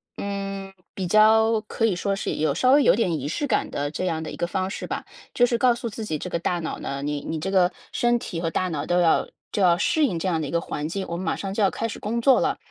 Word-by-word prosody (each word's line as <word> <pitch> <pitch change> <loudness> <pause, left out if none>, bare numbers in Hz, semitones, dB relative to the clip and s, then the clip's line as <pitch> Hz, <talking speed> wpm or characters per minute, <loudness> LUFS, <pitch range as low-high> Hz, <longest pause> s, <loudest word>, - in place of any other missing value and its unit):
呃， 195 -1 -5 0.2
比 185 -2 -3
较 220 +3 +5
可 225 - 0
以 220 - +2
说 195 +2 -1
是 - - -3
有 150 -2 0
稍 255 +9 +3
微 285 +2 +6
有 - - +6
点 180 -8 0
仪 140 - -4
式 170 - -2
感 280 - 0
的 145 0 -3
这 185 - -3
样 160 -3 -1
的 155 - -6
一 - - -8
个 175 - -1
方 185 +2 -2
式 - - -5
吧。 - - -4 0.3
就 245 - +4
是 240 -1 0
告 245 0 +4
诉 235 -1 -4
自 220 +1 -6
己 155 -7 -2
这 180 - -6
个 170 - -1
大 175 +1 -1
脑 160 - -4
呢 140 0 -4
你 145 0 -2
你 160 - -4
这 180 +5 -3
个 185 -2 +4 0.2
身 240 0 +2
体 180 -8 -5
和 165 -1 -1
大 185 +3 -1
脑 150 -4 -3
都 175 0 +2
要 165 -2 +3 0.2
就 205 - -1
要 175 -2 +5
适 300 - +2
应 195 -11 -1
这 165 - -4
样 165 -3 0
的 150 - -3
一 - - -6
个 170 - +1
环 150 -2 -4
境， 190 +4 -3
我 170 - -3
们 185 - -5
马 - - 0
上 195 -1 -5
就 215 - -1
要 195 - +5
开 205 - -4
始 - - -7
工 230 +3 -2
作 265 +2 +5
了， - - 0
190 Hz, 320 characters per minute, -24 LUFS, 165-220 Hz, 0.3 s, 微